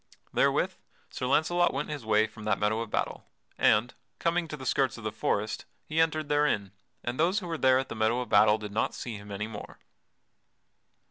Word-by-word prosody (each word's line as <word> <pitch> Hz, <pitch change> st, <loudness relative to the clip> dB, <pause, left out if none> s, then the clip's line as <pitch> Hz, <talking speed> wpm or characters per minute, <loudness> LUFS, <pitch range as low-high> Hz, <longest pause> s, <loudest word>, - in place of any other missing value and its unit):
Therewith -, -, +2 dB, 0.4 s
Sir 125 Hz, -, -3 dB
Launcelot 175 Hz, +5 st, +2 dB
went 145 Hz, +3 st, -2 dB
his 150 Hz, -4 st, -5 dB
way 110 Hz, 0 st, +3 dB
from 110 Hz, 0 st, -11 dB
that 105 Hz, -3 st, +2 dB
meadow 105 Hz, +2 st, +1 dB
of 115 Hz, -, -5 dB
battle, -, -, -2 dB, 0.3 s
and, 110 Hz, +4 st, +3 dB, 0.2 s
coming 170 Hz, 0 st, 0 dB
to 150 Hz, -, -6 dB
the 130 Hz, -, -8 dB
skirts 130 Hz, -2 st, +1 dB
of 115 Hz, -, -10 dB
the 110 Hz, -, -2 dB
forest 110 Hz, 0 st, -1 dB, 0.2 s
he 160 Hz, +1 st, +1 dB
entered 155 Hz, -2 st, +1 dB
therein, 145 Hz, -10 st, +1 dB, 0.3 s
and 120 Hz, +3 st, -3 dB
those 175 Hz, +5 st, +3 dB
who 200 Hz, -, -2 dB
were 170 Hz, -1 st, -3 dB
there 130 Hz, -4 st, +4 dB
at 130 Hz, -, -1 dB
the -, -, -5 dB
meadow 110 Hz, +2 st, +2 dB
of 125 Hz, -, -3 dB
battle 105 Hz, 0 st, +6 dB
did 105 Hz, -1 st, -7 dB
not 110 Hz, +2 st, 0 dB
see 120 Hz, -3 st, -5 dB
him 105 Hz, 0 st, -11 dB
any 100 Hz, +2 st, -3 dB
more. 110 Hz, -2 st, -9 dB
120 Hz, 205 wpm, -29 LUFS, 110-150 Hz, 0.4 s, battle